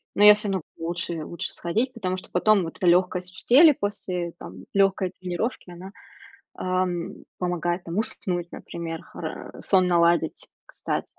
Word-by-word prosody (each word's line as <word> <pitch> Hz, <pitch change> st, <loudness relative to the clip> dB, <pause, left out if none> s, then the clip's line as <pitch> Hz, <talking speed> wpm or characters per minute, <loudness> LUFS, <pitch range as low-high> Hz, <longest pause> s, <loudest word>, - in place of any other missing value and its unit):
но 205 Hz, -, +3 dB
я 210 Hz, -, +11 dB
всё 210 Hz, 0 st, -3 dB
равно 190 Hz, -3 st, -1 dB, 0.2 s
лучше 170 Hz, -1 st, -3 dB
лучше 170 Hz, -, -5 dB
сходить, 225 Hz, +10 st, -1 dB
потому 185 Hz, -5 st, -2 dB
что -, -, -10 dB
потом 200 Hz, +2 st, +4 dB
вот 165 Hz, -, -7 dB
эта 185 Hz, -, 0 dB
лёгкость 180 Hz, +1 st, +2 dB
в -, -, -9 dB
теле 300 Hz, +5 st, +8 dB
после, 185 Hz, -5 st, -3 dB
там, 95 Hz, +2 st, -10 dB
лёгкой 195 Hz, -2 st, +2 dB
тренировки, 185 Hz, +4 st, -3 dB
она, 185 Hz, +3 st, -10 dB, 0.6 s
а, 185 Hz, 0 st, 0 dB, 0.5 s
помогает, 175 Hz, 0 st, -1 dB
там, 170 Hz, +2 st, -5 dB
уснуть, 180 Hz, -6 st, -2 dB
например, 165 Hz, -1 st, -6 dB
хора -, -, -7 dB
сон 185 Hz, -2 st, +3 dB
наладить, 170 Hz, -2 st, +2 dB, 0.2 s
кстати, -, -, -3 dB
180 Hz, 155 wpm, -25 LUFS, 170-200 Hz, 0.6 s, я